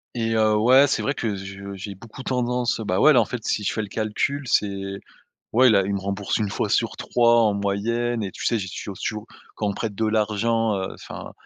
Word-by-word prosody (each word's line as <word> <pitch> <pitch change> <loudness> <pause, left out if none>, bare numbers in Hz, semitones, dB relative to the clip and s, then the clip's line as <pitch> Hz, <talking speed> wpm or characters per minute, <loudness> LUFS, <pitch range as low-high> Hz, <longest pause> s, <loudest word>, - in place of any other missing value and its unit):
et 115 -1 -1
heu, 110 -1 +3
ouais, 130 +6 +6
c'est - - 0
vrai 140 - 0
que 110 -7 -2
je 100 +1 -8
j'ai 100 +1 -7
beaucoup 115 +7 -11
tendance, 125 -1 0
bah, 95 -3 -1
ouais, 155 - +7
là, 125 - +6
en - - 0
fait, 120 0 -6
si 105 - 0
je - - 0
fais 110 - -2
le 105 - -6
calcul 110 +7 -1
c'est 100 -3 -1 0.5
ouais, 125 +3 +6
là, 100 -3 +4
il 100 - -2
me 100 - -1
rembourse 100 +1 -2
1 105 -3 -1
fois - - -1
sur - - 0
3 120 -1 +3
en 105 -2 +3
moyenne 110 +4 -1
et 95 - -4
tu - - -8
sais, 115 - +2
j'ai 95 -2 -5
toujours 95 0 -7
toujours, 110 0 -4 0.3
quand 105 - -2
on - - +1
me - - -7
prête 110 -2 -3
de 110 - 0
l'argent, 110 +1 +1
heu, 95 0 -4
enfin, - - -9
110 Hz, 240 wpm, -23 LUFS, 100-120 Hz, 0.5 s, ouais